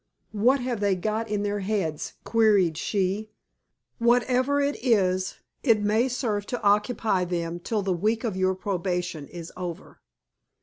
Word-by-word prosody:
"What 245 +6 +3
have 245 -3 -2
they 200 -2 +2
got 215 +4 -2
in 205 -1 -1
their 205 0 -1
heads?" 190 -6 -2
queried 210 -7 +3
she. 200 +4 -1 0.7
"Whatever 250 +4 +3
it 285 -3 -1
is, 185 -6 +2 0.3
it 225 -6 +3
may 220 +4 +2
serve 220 -5 -2
to 245 - -3
occupy 205 -1 +2
them 170 -1 -3
till 210 +3 -2
the 190 -1 +1
week 215 +6 0
of 220 -5 -2
your 185 0 +1
probation 180 -5 -3
is 170 -1 -9
over." 175 -2 -7
205 Hz, 145 wpm, -26 LUFS, 185-225 Hz, 0.7 s, What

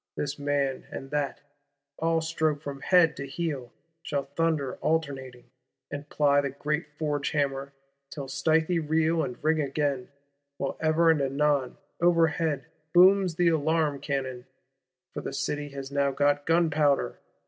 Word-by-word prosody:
This 145 0 -3
man 140 -2 -1
and 135 0 -8
that, 145 -2 -2 0.6
all 165 0 +1
stroke 160 -2 -1
from 140 -2 -6
head 180 -4 +4
to 140 - -5
heel, 140 -5 -4 0.3
shall 145 -4 -2
thunder 160 -5 0
alternating, 135 -6 -2 0.4
and 145 0 -6
ply 145 -1 +3
the 140 - -2
great 150 +4 -2
forge 145 -2 -1
hammer, 140 -2 -1 0.4
till 140 -3 -6
stithy 160 +5 +1
reel 160 +1 +1
and 125 - -4
ring 155 0 +2
again; 140 -2 -1 0.5
while 140 - -2
ever 160 +1 +4
and 155 -3 +1
anon, 140 -1 +1 0.2
overhead, 165 -4 +2 0.3
booms 185 -1 +6
the 175 0 +3
alarm 155 -2 +1
cannon,—for 130 -4 -7
the - - -5
City 145 0 -2
has 140 -1 -7
now 140 0 +2
got 145 +1 +1
gunpowder. 155 -4 +2
145 Hz, 135 wpm, -27 LUFS, 140-160 Hz, 0.6 s, booms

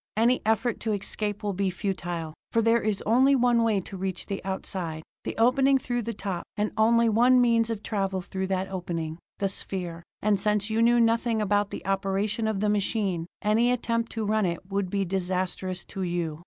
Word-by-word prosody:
Any 240 +3 +3
effort 225 +1 +1
to 220 -1 -1
escape 205 +1 -3
will 205 -1 -1
be 195 +1 0
futile, 175 -4 -3 0.2
for 230 - +2
there 230 +1 +4
is 210 -2 -1
only 260 +5 +5
one 245 -2 +3
way 220 -3 +2
to 195 - -9
reach 185 -1 -3
the 195 -1 -4
outside; 180 -4 -4 0.2
the - - -4
opening 265 +4 +4
through 245 -2 -2
the 230 +1 -3
top; 190 -4 -3 0.2
and 210 +1 0
only 230 +1 +4
one 245 +3 +5
means 230 -2 +3
of 220 -2 -3
travel 195 -3 -1
through 190 +1 -4
that 190 0 -1
opening: 170 -3 -4 0.2
the 200 - 0
sphere. 180 -3 -4 0.2
And 210 -1 +2
since 210 +1 0
you 225 +1 +2
know 240 +1 +5
nothing 230 0 +2
about 205 -1 +1
the - - -7
operation 195 +3 0
of 210 -3 -1
the 210 - +2
machine, 200 -4 0 0.2
any 225 +4 +3
attempt 230 -1 -1
to 225 -1 -2
run 215 -1 +2
it 175 +3 -5
would 195 -1 -1
be 195 0 0
disastrous 185 0 -2
to 195 - -5
you. 170 -4 -2
205 Hz, 195 wpm, -27 LUFS, 190-230 Hz, 0.2 s, only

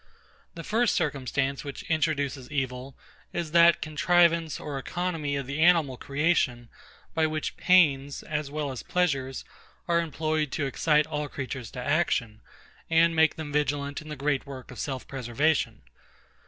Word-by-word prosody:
The 165 - -7
first 230 +4 +1
circumstance 140 -3 -1
which 140 -2 -7
introduces 145 -5 -1
evil, 130 -2 -3 0.4
is 170 -3 -3
that 170 +1 +6
contrivance 165 0 +2
or 145 -2 -5
economy 165 -2 -2
of 140 -1 -3
the 140 +3 -4
animal 165 -6 +4
creation, 140 -4 0 0.4
by 160 -1 +2
which 155 0 -3
pains, 145 -7 +3
as 150 -2 -3
well 145 -1 -3
as 130 - -6
pleasures, 140 -7 -1 0.4
are 170 -1 +3
employed 155 -2 -1
to 145 - -1
excite 150 +3 +2
all 150 -1 -3
creatures 130 -4 -5
to - - -3
action, 140 -8 0 0.5
and 165 0 +4
make 160 0 +4
them 155 -2 -6
vigilant 145 -1 -1
in 155 - -11
the 150 - -5
great 140 0 -1
work 130 -2 -9
of 125 - -10
self 130 -2 -4
preservation. 130 - 0
150 Hz, 150 wpm, -27 LUFS, 135-160 Hz, 0.5 s, that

